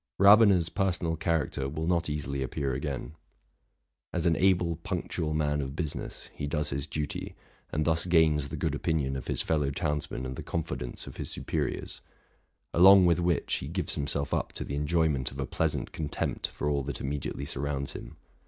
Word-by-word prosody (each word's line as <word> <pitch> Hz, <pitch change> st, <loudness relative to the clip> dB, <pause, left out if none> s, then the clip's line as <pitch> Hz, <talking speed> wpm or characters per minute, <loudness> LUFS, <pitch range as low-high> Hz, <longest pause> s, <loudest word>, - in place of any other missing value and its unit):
Rabener's 100 Hz, -4 st, +7 dB
personal 85 Hz, -4 st, 0 dB
character 80 Hz, -4 st, -1 dB
will 80 Hz, +3 st, -3 dB
not 85 Hz, -1 st, +1 dB
easily 70 Hz, -2 st, -2 dB
appear 65 Hz, +1 st, -1 dB
again. 70 Hz, +2 st, -4 dB, 1.0 s
As 85 Hz, -1 st, -1 dB
an 85 Hz, -1 st, +4 dB
able, 90 Hz, -3 st, +3 dB
punctual 85 Hz, -2 st, -2 dB
man 75 Hz, -1 st, +1 dB
of 70 Hz, 0 st, -5 dB
business, 80 Hz, -3 st, -5 dB
he 70 Hz, -, -4 dB
does 75 Hz, 0 st, -1 dB
his 70 Hz, +1 st, -1 dB
duty, 75 Hz, -1 st, -4 dB, 0.4 s
and 75 Hz, +1 st, 0 dB
thus 80 Hz, +1 st, +1 dB
gains 80 Hz, -4 st, +4 dB
the -, -, -4 dB
good 80 Hz, -3 st, 0 dB
opinion 75 Hz, -2 st, 0 dB
of 65 Hz, -, -5 dB
his -, -, 0 dB
fellow 75 Hz, -3 st, +1 dB
townsmen 75 Hz, -2 st, -2 dB
and 65 Hz, 0 st, -4 dB
the -, -, -4 dB
confidence 75 Hz, -7 st, -4 dB
of -, -, -10 dB
his -, -, -4 dB
superiors; -, -, -3 dB, 0.7 s
along 95 Hz, +2 st, +8 dB
with 85 Hz, -1 st, +4 dB
which, 85 Hz, -1 st, +1 dB
he 65 Hz, -, -6 dB
gives 85 Hz, +1 st, -1 dB
him 70 Hz, -, -2 dB
self 70 Hz, 0 st, -1 dB
up -, -, -1 dB
to -, -, -4 dB
the -, -, -6 dB
enjoyment 75 Hz, -2 st, +1 dB
of 65 Hz, -, -10 dB
a 70 Hz, -, 0 dB
pleasant -, -, -1 dB
contempt 75 Hz, -2 st, -2 dB
for 75 Hz, -, -4 dB
all 70 Hz, -1 st, +1 dB
that 70 Hz, -1 st, -4 dB
immediately 70 Hz, 0 st, -3 dB
surrounds 70 Hz, 0 st, -2 dB
him. -, -, -9 dB
75 Hz, 180 wpm, -29 LUFS, 70-85 Hz, 1.0 s, along